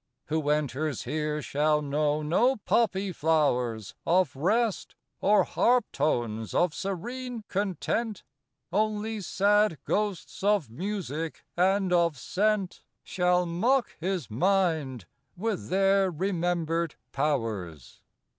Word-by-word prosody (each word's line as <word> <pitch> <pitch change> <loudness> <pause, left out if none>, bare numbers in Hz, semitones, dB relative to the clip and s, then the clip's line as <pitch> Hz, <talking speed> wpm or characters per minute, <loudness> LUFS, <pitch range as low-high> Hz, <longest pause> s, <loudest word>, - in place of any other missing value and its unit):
Who 155 -1 0
enters 150 -1 -1
here 150 -1 -2
shall 150 +1 +2
know 150 +1 0
no 235 - +3
poppy 200 -3 +1
flowers 125 - 0
Of 170 -5 +2
Rest, 210 - 0 0.2
or 210 +1 +4
harp 245 -2 +2
tones 120 -7 -1
of 175 -3 +3
serene 235 +5 -4
Content; 205 +2 -2 0.5
Only 215 +1 0
sad 205 -1 +2
ghosts 205 -5 -2
of 200 - +2
music 165 - -4
and 190 +1 +2
of 170 -4 +3
scent 200 - 0 0.2
Shall 180 0 +1
mock 230 +10 +1
his 180 -4 -2
mind 160 - +1 0.3
with 215 0 -3
their 195 +1 +3
remembered 170 -2 -1 0.2
powers. 110 - -2
180 Hz, 105 wpm, -28 LUFS, 150-205 Hz, 0.5 s, or